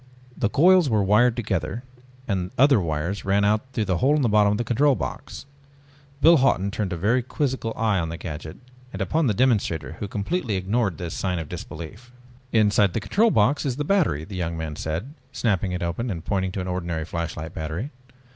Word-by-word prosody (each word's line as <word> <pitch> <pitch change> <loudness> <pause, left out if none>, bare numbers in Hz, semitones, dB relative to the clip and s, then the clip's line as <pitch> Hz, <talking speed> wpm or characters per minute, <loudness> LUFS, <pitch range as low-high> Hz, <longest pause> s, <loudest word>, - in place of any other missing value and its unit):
The 115 - 0
coils 175 +3 +5
were 110 -3 +2
wired 110 +5 +4
together 100 -2 -2 0.4
and 95 -3 -1
other 135 -2 +5
wires 85 +3 -2
ran 100 +1 +2
out 105 +1 +3
through 110 -4 -1
the 95 -3 0
hole 140 +3 +3
in 150 - +1
the 120 - +2
bottom 105 -1 +4
of - - -1
the 120 - -1
control 135 +4 +3
box. - - -6 0.8
Biff 165 0 +7
Hawton 100 -7 +2
turned 100 -2 -3
a 90 - -2
very 110 +9 +2
quizzical 130 -2 -2
eye 110 -4 +1
on 80 -1 -2
the 85 - -5
gadget 80 -2 -7 0.3
and - - -7
upon 160 -2 +1
the 105 - +1
demonstrator 100 - 0
who 100 - -3
completely 110 - -2
ignored 95 -1 0
this 85 -1 -5
sign 90 -2 -2
of 80 -3 -5
disbelief. 100 +10 -8 0.4
"Inside 105 -3 +3
the - - 0
control 205 - +2
box 140 - +2
is 135 -4 -1
the 145 - -2
battery," 150 - +1
the 95 +4 -8
young 85 -2 -3
man 80 -2 -4
said, 85 - -4 0.2
snapping 100 -7 0
it 90 0 -3
open 90 +9 -2
and 85 -6 -5
pointing 95 -2 -1
to 95 - -3
an 90 - -5
ordinary 85 -3 -3
flashlight 85 -1 -5
battery. 80 - -4
100 Hz, 205 wpm, -24 LUFS, 85-125 Hz, 0.8 s, Biff